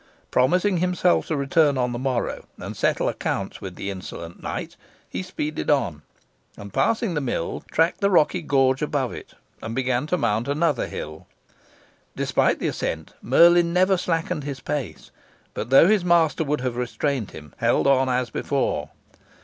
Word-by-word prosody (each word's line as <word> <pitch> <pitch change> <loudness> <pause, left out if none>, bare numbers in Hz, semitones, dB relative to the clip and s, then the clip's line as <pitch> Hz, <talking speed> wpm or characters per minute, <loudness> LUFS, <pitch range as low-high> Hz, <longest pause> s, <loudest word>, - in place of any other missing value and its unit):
Promising 180 +9 +3
himself 180 0 +2
to 160 - -1
return 140 +1 +2
on 125 -1 0
the 120 - -4
morrow, 130 -2 -2
and - - -7
settle - - +1
accounts - - -3
with - - -7
the 100 - -4
insolent 85 -3 -8
knight, - - -5 0.3
he - - -4
speeded 155 -5 -4
on, 85 - +1 0.6
and, 100 -1 -10
passing 225 -4 +1
the 150 - -1
mill, 120 -10 -3
tracked 165 +5 +1
the 200 - +3
rocky 175 -1 +3
gorge 135 -3 +2
above 145 -4 -1
it, - - -10 0.3
and 115 +1 -5
began 130 +1 0
to 180 - +1
mount 110 -4 0
another 145 -2 +1
hill. 75 +1 -7 0.9
Despite - - +1
the - - -2
ascent, 80 -2 -4
Merlin 170 +6 +5
never 185 +2 +4
slackened 165 -3 -2
his 140 -2 -5
pace, 140 +1 -5 0.4
but, - - -5
though 135 +5 +7
his 210 -2 +3
master 170 -2 +3
would 150 -2 -1
have 125 -2 -2
restrained 125 -1 -2
him, 75 -1 -12
held - - +2
on 135 -1 +3
as 125 -1 0
before. - - -1
140 Hz, 165 wpm, -24 LUFS, 125-170 Hz, 0.9 s, though